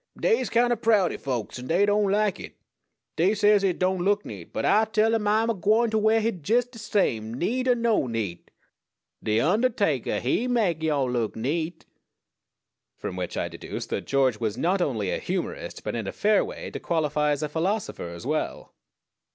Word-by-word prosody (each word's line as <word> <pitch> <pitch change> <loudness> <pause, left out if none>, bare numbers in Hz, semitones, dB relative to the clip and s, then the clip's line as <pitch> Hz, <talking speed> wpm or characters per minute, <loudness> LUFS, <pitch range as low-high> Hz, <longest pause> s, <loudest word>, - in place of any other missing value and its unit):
"Dey's 455 -1 +2
kind 240 +1 +3
o' - - +1
proudy 215 -6 +2
folks, 125 -3 -4
an' 125 - -8
dey 180 +5 +3
don't 205 0 +2
like 210 -2 +1
it. - - -9 0.6
Dey 185 +6 +3
says 205 0 +4
hit 190 -3 +1
don't 185 -1 0
look 205 +2 +1
neat; 95 -6 -9
but 110 - -2
Ah 215 +2 +4
tell 220 +1 +2
'um 215 -2 0
Ah'm 220 +2 +3
a - - 0
gwine 215 +4 +2
t' 220 - +1
wear 220 +1 +3
hit 215 -9 -3
jes' 240 +2 +4
de 245 -2 -14
same, 120 - 0
neat 250 - -1
er 250 - +4
no 230 - +1
neat 110 -7 -4 0.7
de 110 0 0
undahtakah, 190 - +1
he 180 - 0
mek 210 -10 +1
yo' 150 -4 +1
look 120 -3 -1
neat!" 155 +9 -3 1.1
From - - -5
which 90 -1 -4
I - - -1
deduced - - -7
that - - -3
George 130 -5 +2
was 110 -2 -2
not 185 +3 +1
only 110 - -1
a - - -1
humorist, 475 - -4
but - - -3
in - - -3
a - - -2
fair 210 0 +2
way - - -7
to - - -5
qualify 150 -2 0
as 145 0 0
a - - 0
philosopher 170 - -2
as 85 +5 -9
well. 155 +3 -3
185 Hz, 195 wpm, -26 LUFS, 135-220 Hz, 1.1 s, says